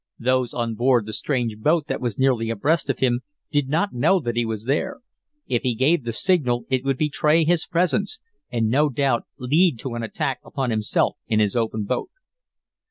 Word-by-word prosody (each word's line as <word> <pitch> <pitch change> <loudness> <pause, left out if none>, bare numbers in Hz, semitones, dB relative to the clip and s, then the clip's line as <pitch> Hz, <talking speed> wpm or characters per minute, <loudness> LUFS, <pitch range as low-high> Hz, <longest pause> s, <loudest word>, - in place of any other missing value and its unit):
Those 130 0 +1
on 120 -2 -1
board 120 -1 +2
the 110 - -6
strange 120 -4 -1
boat 155 +6 +2
that - - -3
was 120 -4 -2
nearly 125 -4 +2
abreast 135 +8 0
of - - 0
him 125 -2 +1 0.3
did 145 -3 +1
not 170 +7 0
know 185 +10 +3
that 120 -7 -3
he 120 -1 0
was 110 -1 -4
there. 140 - -1 0.4
If 120 - 0
he 125 -3 0
gave 140 +3 +2
the 115 - -1
signal 125 - +1
it 130 -1 +1
would 135 -1 0
betray 155 +2 +2
his 170 0 +1
presence, 185 - 0 0.3
and 115 -2 +1
no 145 +6 +3
doubt 135 -2 0
lead 150 +3 +2
to 130 - -5
an 120 - -3
attack 110 -2 -2
upon 130 -3 -3
himself 110 -1 0
in 110 - +1
his 105 0 +1
open 110 -2 -1
boat. 100 - -2
130 Hz, 195 wpm, -23 LUFS, 115-150 Hz, 0.4 s, know